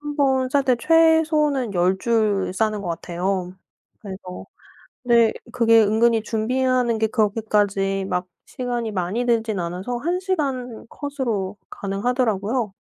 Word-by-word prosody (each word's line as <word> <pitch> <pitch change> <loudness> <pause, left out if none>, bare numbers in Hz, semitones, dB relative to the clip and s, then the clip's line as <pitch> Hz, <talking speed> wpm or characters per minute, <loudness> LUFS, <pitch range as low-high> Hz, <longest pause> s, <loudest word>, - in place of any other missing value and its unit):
1 295 0 -5
번 265 -3 +2
쌀 280 +1 +2
때 255 -2 +3
최소는 305 - +3
10 180 +2 +2
줄 215 -5 +1
싸는 215 0 0
것 180 - -5
같아요. 180 +2 -3 0.5
그래서 190 -4 -8 0.6
네 235 -2 +4 0.2
그게 230 -2 +5
은근히 225 +1 +2
준비하는 245 +1 0
게 220 - +2
그렇게까지 205 -3 0
막 180 -1 -2 0.2
시간이 240 -4 -3
많이 195 +6 -2
들지는 225 -5 0
않아서 180 +8 -4
1 345 +7 -1
시간 270 - -3
컷으로 235 -10 -3
가능하더라고요. 215 +1 -1
225 Hz, 260 characters per minute, -22 LUFS, 195-255 Hz, 0.6 s, 그게